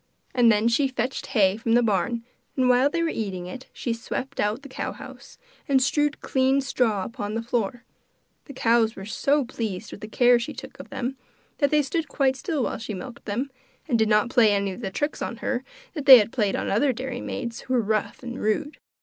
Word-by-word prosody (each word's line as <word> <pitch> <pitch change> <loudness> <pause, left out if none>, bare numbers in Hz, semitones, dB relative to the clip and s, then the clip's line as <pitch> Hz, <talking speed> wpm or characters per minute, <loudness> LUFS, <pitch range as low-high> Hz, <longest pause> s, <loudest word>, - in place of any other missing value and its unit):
And 240 -2 +5
then 215 +1 +2
she 255 +4 +3
fetched 255 0 -3
hay 200 -5 +3
from 225 0 0
the 240 +1 +5
barn, 225 +2 0 0.3
and 255 -1 +3
while 250 +3 +4
they 335 +2 -1
were 330 - +1
eating 190 - -4
it, 255 +8 -8
she 235 - -3
swept 255 +3 -5
out 215 +6 0
the - - -8
cow 260 - -4
house, - - -12 0.3
and 275 -1 +4
strewed 295 +2 +1
clean 265 +1 +2
straw 235 -7 0
upon 205 0 -5
the 225 - -1
floor. 240 0 -2 0.6
The 280 - -10
cows 230 -2 +2
were 195 - -8
so 280 +6 +1
pleased 220 -5 -5
with - - -10
the 215 - -6
care 245 +2 +4
she 235 - -5
took - - -10
of - - -10
them 260 +2 -4 0.4
that 285 -3 +3
they 300 0 +3
stood 310 +4 -2
quite 275 -2 +1
still 305 -2 -2
while - - -2
she 220 -2 -5
milked 235 +6 -9
them, 245 +7 -2 0.4
and 240 -6 +1
did 220 -1 +3
not 210 +2 +3
play 225 -4 +5
any 200 -1 0
of 190 - -8
the 195 - -3
tricks 290 +10 -3
on 235 - -3
her 255 +1 -2 0.3
that 295 -3 -6
they 265 -2 +13
had 220 0 +1
played 210 -5 +1
on - - -2
other 255 +6 +2
dairymaids 245 -1 -5
who 260 - -2
were 240 - +3
rough 215 +1 -2
and 240 0 -6
rude. 285 +8 -1
240 Hz, 220 wpm, -25 LUFS, 215-265 Hz, 0.6 s, they